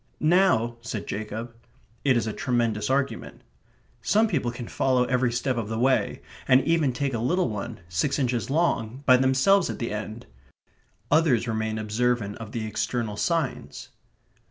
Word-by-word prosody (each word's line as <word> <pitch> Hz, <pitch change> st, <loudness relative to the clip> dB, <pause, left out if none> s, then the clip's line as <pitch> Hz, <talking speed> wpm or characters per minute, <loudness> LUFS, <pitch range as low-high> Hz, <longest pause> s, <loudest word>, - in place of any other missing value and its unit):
"Now..." 155 Hz, -9 st, +3 dB
said 115 Hz, -3 st, -5 dB
Jacob. 110 Hz, +3 st, -5 dB, 0.5 s
It 130 Hz, -3 st, +3 dB
is 115 Hz, -, 0 dB
a 110 Hz, -, -3 dB
tremendous 115 Hz, -4 st, -1 dB
argument. 135 Hz, +1 st, -2 dB, 0.6 s
Some 220 Hz, +2 st, +3 dB
people 145 Hz, -, -1 dB
can 120 Hz, 0 st, -7 dB
follow 130 Hz, -2 st, +1 dB
every 125 Hz, -1 st, +1 dB
step 125 Hz, +1 st, -1 dB
of 110 Hz, -3 st, -3 dB
the 110 Hz, -, -3 dB
way, 130 Hz, +2 st, +1 dB, 0.2 s
and 130 Hz, -1 st, +6 dB
even 160 Hz, -2 st, +2 dB
take 135 Hz, +2 st, -2 dB
a 115 Hz, -, -1 dB
little 175 Hz, +7 st, +1 dB
one, 110 Hz, 0 st, -6 dB
six 90 Hz, +11 st, 0 dB
inches 125 Hz, -3 st, -1 dB
long, 135 Hz, -5 st, 0 dB
by 130 Hz, -1 st, +7 dB
themselves 130 Hz, +9 st, +3 dB
at -, -, -4 dB
the 115 Hz, -, -3 dB
end; 110 Hz, +2 st, -6 dB, 0.9 s
others 145 Hz, -7 st, +3 dB
remain 110 Hz, -1 st, -2 dB
observant 110 Hz, -1 st, -1 dB
of 110 Hz, -2 st, -8 dB
the 115 Hz, -2 st, -3 dB
external 110 Hz, 0 st, -2 dB
signs. 130 Hz, -, -2 dB
120 Hz, 155 wpm, -25 LUFS, 110-135 Hz, 0.9 s, by